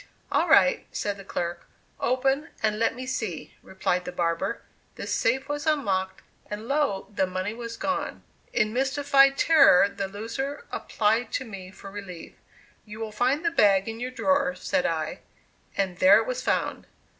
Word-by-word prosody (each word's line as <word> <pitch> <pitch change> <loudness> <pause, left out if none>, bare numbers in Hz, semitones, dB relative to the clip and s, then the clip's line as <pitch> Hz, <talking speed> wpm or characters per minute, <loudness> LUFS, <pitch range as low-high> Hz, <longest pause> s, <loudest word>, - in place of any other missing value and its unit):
"All - - +2
right," - - +5
said 205 -1 -2
the 195 - -10
clerk. 175 -2 -4 0.3
"Open, 270 +5 +1
and 215 -1 +1
let 230 0 +1
me 255 +1 -6
see," 220 -10 -4
replied 180 -1 -1
the - - -5
barber. 170 -1 -1 0.3
The - - -6
safe 265 +1 0
was 290 +2 -3
unlocked 195 -11 0 0.3
and 210 +2 -6
lo! 275 -9 0
the 190 -2 +1
money 185 +3 -3
was 230 0 -7
gone! 280 - -3 0.3
In 215 -1 +1
mystified 275 +1 +3
terror 275 - +6
the 200 -1 -4
loser 250 - -5
applied 220 +3 0
to 265 - -1
me 195 -5 -9
for 195 +1 -11
relief. 195 -4 -9 0.5
"You 210 0 -10
will 220 -1 -4
find 255 +9 0
the 335 - +2
bag 200 - +4
in 225 0 -5
your 250 +1 -3
drawer," 275 +1 +1
said 275 -2 0
I, 160 -2 -2 0.6
and 190 -3 -1
there 190 +2 +8
it 225 - +1
was 255 +1 -3
found! - - -1
225 Hz, 170 wpm, -26 LUFS, 195-270 Hz, 0.6 s, there